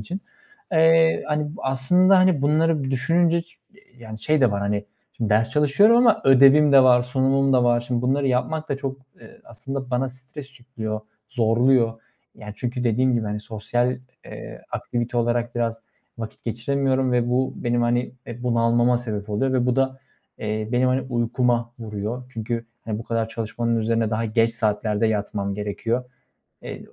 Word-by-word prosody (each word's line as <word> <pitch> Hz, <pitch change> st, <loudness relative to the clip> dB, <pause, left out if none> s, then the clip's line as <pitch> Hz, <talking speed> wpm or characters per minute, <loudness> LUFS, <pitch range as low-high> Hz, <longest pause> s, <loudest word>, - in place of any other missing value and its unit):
için. 185 Hz, +3 st, -6 dB, 0.5 s
Eee, 160 Hz, 0 st, +4 dB
hani, 150 Hz, +2 st, -2 dB
bu -, -, -9 dB
aslında, 180 Hz, +9 st, +3 dB
hani, 185 Hz, -6 st, +3 dB
bunları 155 Hz, +1 st, +2 dB
bir 130 Hz, -, -3 dB
düşününce 165 Hz, +6 st, +1 dB
ç 170 Hz, 0 st, -26 dB, 0.4 s
yani, 110 Hz, -2 st, -10 dB
şey 155 Hz, -1 st, +1 dB
de 125 Hz, -, +4 dB
var, 100 Hz, 0 st, -2 dB
hani, 100 Hz, 0 st, -2 dB, 0.3 s
şimdi 110 Hz, -2 st, -3 dB
ders 115 Hz, +2 st, +2 dB
çalışıyorum 150 Hz, +11 st, +4 dB
ama 240 Hz, -2 st, +4 dB
ödevim 135 Hz, +2 st, +6 dB
de 135 Hz, -1 st, +8 dB
var, 125 Hz, -1 st, +5 dB
sunumum 135 Hz, +2 st, +1 dB
da 125 Hz, -1 st, +3 dB
var. 120 Hz, 0 st, +3 dB
Şimdi 120 Hz, 0 st, -3 dB
bunları 135 Hz, +2 st, +1 dB
yapmak 155 Hz, +5 st, -1 dB
da 140 Hz, -, -1 dB
çok, 135 Hz, -1 st, -5 dB, 0.2 s
eee, 235 Hz, +1 st, -16 dB
aslında 130 Hz, +3 st, -7 dB
bana 130 Hz, +2 st, 0 dB
stres 135 Hz, +2 st, -12 dB
yüklüyor, 110 Hz, -4 st, -5 dB, 0.3 s
zorluyor. 115 Hz, -1 st, +2 dB, 0.3 s
Yani, 105 Hz, -1 st, -9 dB
çünkü 125 Hz, +1 st, -3 dB
dediğim 125 Hz, +3 st, +2 dB
gibi, 115 Hz, -2 st, 0 dB
hani, 105 Hz, 0 st, -4 dB
sosyal, 120 Hz, +4 st, -2 dB, 0.3 s
eee, -, -, -10 dB
aktivite 120 Hz, 0 st, -3 dB
olarak 120 Hz, 0 st, 0 dB
biraz 115 Hz, -1 st, -2 dB, 0.4 s
vakit 110 Hz, -1 st, -8 dB
geçiremiyorum 130 Hz, +2 st, 0 dB
ve 120 Hz, -1 st, +1 dB
bu 130 Hz, +2 st, 0 dB
benim, 120 Hz, 0 st, -1 dB
hani, 120 Hz, +1 st, 0 dB
eee, 120 Hz, 0 st, -8 dB
bunalmama 120 Hz, 0 st, +2 dB
sebep 110 Hz, -3 st, -5 dB
oluyor 130 Hz, +6 st, 0 dB
ve 125 Hz, -1 st, +1 dB
bu 125 Hz, 0 st, +1 dB
da, 135 Hz, 0 st, 0 dB, 0.4 s
eee, 110 Hz, 0 st, -3 dB
benim, 125 Hz, +1 st, +2 dB
hani, 130 Hz, +1 st, +1 dB
uykuma 120 Hz, -1 st, -1 dB
vuruyor. 110 Hz, +2 st, -5 dB
Çünkü, 115 Hz, +1 st, -4 dB, 0.2 s
hani, 110 Hz, -1 st, -3 dB
bu 115 Hz, -, -6 dB
kadar 115 Hz, -1 st, -2 dB
çalışmanın 115 Hz, +1 st, -2 dB
üzerine 115 Hz, 0 st, 0 dB
daha 115 Hz, +1 st, -1 dB
geç 115 Hz, +1 st, +1 dB
saatlerde 105 Hz, 0 st, 0 dB
yatmam 100 Hz, -2 st, -2 dB
gerekiyor. 110 Hz, +4 st, -3 dB, 0.6 s
Eee, -, -, -8 dB
120 Hz, 170 wpm, -23 LUFS, 115-135 Hz, 0.6 s, de